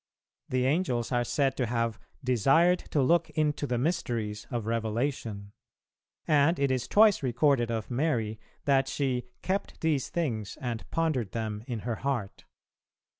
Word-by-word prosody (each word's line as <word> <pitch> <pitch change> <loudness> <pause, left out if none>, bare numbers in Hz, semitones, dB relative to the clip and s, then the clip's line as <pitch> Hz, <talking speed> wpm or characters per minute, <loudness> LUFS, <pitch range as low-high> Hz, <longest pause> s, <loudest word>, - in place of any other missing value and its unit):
The 130 0 +1
Angels 130 -6 0
are 120 -1 +2
said 135 +2 +1
to 125 - 0
have 115 -1 -1 0.2
"desired 135 - +4
to 145 - +2
look 170 +4 +3
into 150 -1 +1
the 125 -1 0
mysteries 115 -8 -2
of 120 -3 -3
Revelation," 115 -2 -2 0.8
and 150 +3 +4
it 140 -1 +1
is 130 -2 -1
twice 210 -1 +5
recorded 125 -1 +2
of 115 +1 -3
Mary 120 -6 0 0.3
that 135 -1 +3
she 125 -3 -1 0.2
"kept 195 +2 -2
these 150 -4 +1
things 115 - -2
and 120 -3 -4
pondered 155 - 0
them 110 -2 -3
in 120 -5 -3
her 115 -1 -3
heart." 125 -7 -3
125 Hz, 145 wpm, -29 LUFS, 115-145 Hz, 0.8 s, twice